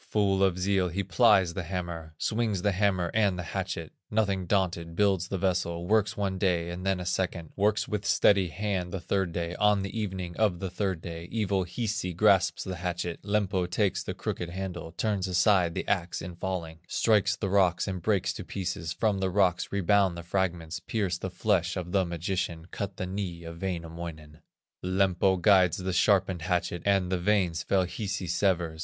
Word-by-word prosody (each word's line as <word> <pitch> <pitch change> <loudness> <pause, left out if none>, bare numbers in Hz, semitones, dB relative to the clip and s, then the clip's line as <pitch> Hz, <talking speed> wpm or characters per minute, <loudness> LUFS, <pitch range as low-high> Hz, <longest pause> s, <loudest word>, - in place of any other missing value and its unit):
Full 100 -2 +2
of 95 -2 +2
zeal 95 0 +1
he 100 +4 -2
plies 95 0 +4
the 95 - -3
hammer, 85 -3 -5
Swings 110 -3 -1
the 100 - +3
hammer 95 -3 +1
and 100 -4 +2
the 90 - -3
hatchet; 80 - -4 0.2
Nothing 100 -4 0
daunted, 85 -4 0
builds 95 -3 +2
the 95 - -2
vessel, 85 -2 -1
Works 110 +2 +2
one 95 -2 -1
day 85 -3 +1
and 90 +1 -6
then 95 -1 +1
a 90 - -5
second, 90 -2 -2
Works 105 +1 +1
with 105 -2 -2
steady 95 0 +4
hand 95 0 -2
the 95 - -3
third 95 0 -1
day; 85 +1 -3
On 105 -2 +3
the 100 - -6
evening 95 -5 -3
of 105 -5 +2
the 95 0 -4
third 95 -3 -2
day, 85 0 -6
Evil 100 -4 0
Hisi 105 0 -2
grasps - - +3
the 95 -1 -5
hatchet, 85 -1 -3
Lempo 100 -3 0
takes 95 +1 +1
the - - -5
crooked 85 - -4
handle, 90 -2 -5
Turns 95 +2 -1
aside 90 -2 +3
the - - -3
axe 85 -3 0
in 85 +1 -7
falling, 85 -3 -4
Strikes 110 -3 +2
the 100 - -3
rocks 95 -2 +3
and 95 -2 -3
breaks 95 -1 +1
to - - -7
pieces; 90 -3 -4
From 105 +1 0
the 95 -1 0
rocks 90 -2 +1
rebound 100 -2 +2
the 85 - -6
fragments, 85 -3 -2
Pierce 95 -5 -2
the 95 - -4
flesh 90 -1 0
of 90 -1 -4
the 95 -1 +2
magician, 85 -1 -3
Cut 100 -2 -4
the 95 - -2
knee 90 -3 -4
of 85 0 -9
Wainamoinen. 85 -4 -5 0.4
Lempo 95 0 +2
guides 90 -2 +5
the 95 0 -3
sharpened 95 -2 +3
hatchet, 85 -1 -1
And 95 -2 +2
the 90 - +1
veins 90 -4 +1
fell 95 +1 +2
Hisi 95 +2 -4
severs. 85 -2 0
95 Hz, 185 wpm, -28 LUFS, 85-100 Hz, 0.4 s, guides